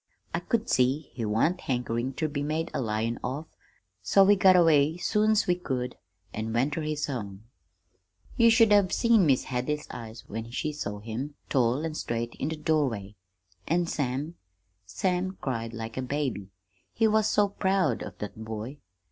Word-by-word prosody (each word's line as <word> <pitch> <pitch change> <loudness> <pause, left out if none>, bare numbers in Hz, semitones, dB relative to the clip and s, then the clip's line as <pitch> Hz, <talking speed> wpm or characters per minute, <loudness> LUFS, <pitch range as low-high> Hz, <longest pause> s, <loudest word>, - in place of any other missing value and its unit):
I - - 0
could 235 -1 -1
see 135 +4 +1
he 115 - -3
wan't 115 +13 +1
hankerin' 125 0 -2
ter 155 +4 -1
be 145 -1 -3
made 155 +3 -2
a - - -1
lion 115 0 -1
of, 135 +5 -3 0.6
so 100 - +5
we 205 +1 +6
got 190 -1 +6
away 160 -2 +4
soon's 215 +3 +2
we 180 - +3
could 130 -8 -3 0.4
an' 110 +1 -3
went 130 +5 +1
ter 160 - -2
his 155 -1 -2
home. 105 -7 -5 0.9
"You 230 -1 +6
should 225 -1 +5
have 200 -3 +5
seen 230 -7 +4
Mis' 135 -3 +3
Hadley's 135 +4 -2
eyes 115 0 -9
when 115 +2 -6
she 150 +5 -3
saw 105 -8 -5
him, 120 +7 -5
tall 130 +3 +2
an' 160 - -3
straight 115 -5 -3
in 140 - -1
the 160 - -3
doorway. 130 -10 0 0.5
And 170 +1 +1
Sam 145 +3 -2 0.5
Sam 185 - -1
cried 115 -4 -3
like 115 0 -7
a - - 0
baby, 130 -7 -2 0.4
he 225 - +2
was 215 0 +3
so 205 -1 +3
proud 190 - +1
of - - -7
that 105 +1 -7
boy. 110 +6 -6
140 Hz, 175 wpm, -28 LUFS, 115-175 Hz, 0.9 s, we